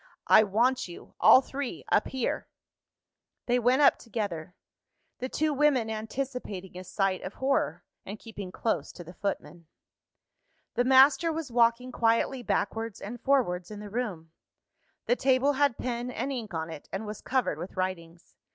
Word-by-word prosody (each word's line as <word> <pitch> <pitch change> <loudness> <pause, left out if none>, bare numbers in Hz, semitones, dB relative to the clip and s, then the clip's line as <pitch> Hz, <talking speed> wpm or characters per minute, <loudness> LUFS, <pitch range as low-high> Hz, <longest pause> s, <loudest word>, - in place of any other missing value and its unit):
"I - - +7
want 235 +5 +1
you, 175 - -12
all 255 - +8
three, 275 -1 -5
up - - +3
here." 260 -3 -2 1.0
They 245 0 +2
went 250 +4 +3
up 275 - +5
together 190 -8 -5 0.6
the 255 - -3
two 310 +2 0
women 270 -6 +2
anticipating 220 -4 -5
a 185 - -7
sight 185 +1 -1
of 195 - -7
horror, 270 +1 0 0.2
and 205 - -7
keeping 205 -5 -8
close 225 - -2
to 175 - -9
the 175 +2 -12
footman. 175 -4 -5 1.1
The 245 - +1
master 270 +5 +6
was 320 -5 -4
walking 235 +1 +2
quietly 235 +2 +1
backwards 225 -2 -2
and 235 +3 -7
forwards 185 -11 +1
in 210 -1 -8
the 210 -1 -9
room: 195 -9 -4 0.7
the 245 - +3
table 265 +2 +3
had 285 -3 +2
pen 245 0 -3
and 265 +2 -3
ink 235 -5 -5
on 160 -1 -4
it, 155 -2 -10
and 195 +3 -4
was 210 0 -7
covered 255 - 0
with 180 +3 -8
writings. 175 -2 -4
230 Hz, 160 wpm, -28 LUFS, 190-260 Hz, 1.1 s, all